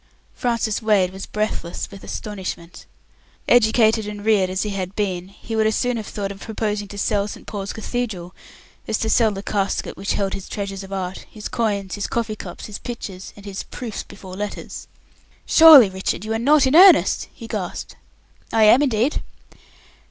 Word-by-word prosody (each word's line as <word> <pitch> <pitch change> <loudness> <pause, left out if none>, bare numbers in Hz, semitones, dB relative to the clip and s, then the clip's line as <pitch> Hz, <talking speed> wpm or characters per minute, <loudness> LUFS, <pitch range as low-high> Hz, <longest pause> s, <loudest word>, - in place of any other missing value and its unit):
Francis 230 -3 -1
Wade 205 -5 +3
was 190 - -7
breathless 210 -5 -3
with 200 -1 -11
astonishment. 185 -4 -6 0.6
Educated 220 -2 +4
and 205 0 -7
reared 205 -4 +3
as 185 0 -1
he 210 - -3
had 190 -1 -4
been, 185 -4 -2
he 210 +3 -8
would 220 0 +3
as 220 - +1
soon 245 0 0
have 220 - -6
thought 200 -1 -4
of 195 - -10
proposing 210 -1 -3
to 205 - -10
sell 200 0 0
St. - - -9
Paul's 200 -2 -5
Cathedral 215 -6 -4 0.5
as 220 - 0
to 220 - -1
sell 230 -2 +4
the 195 -1 -6
casket 200 -2 -2
which 195 - -2
held 195 -1 -1
his 195 - -7
treasures 200 -2 -4
of 195 - -11
art 190 -1 -5
his 210 -1 -7
coins, 200 -4 -1
his 205 - -3
coffee 230 -2 -2
cups, - - -8
his 205 -2 -7
pictures, 195 -6 -7
and 205 - -14
his 195 -1 -5
"proofs 230 -5 -6
before 185 -1 -11
letters". 205 +1 -6 0.6
"Surely, 315 -8 +9
Richard, 190 +1 -3
you 220 - -2
are 225 - -1
not 285 +4 +4
in 260 +3 +2
earnest?" 370 +2 +6
he 230 - -11
gasped. 205 -6 -5 0.6
"I 225 - +3
am, 215 +6 +7
indeed." 255 0 +1
210 Hz, 180 wpm, -21 LUFS, 195-225 Hz, 0.6 s, Surely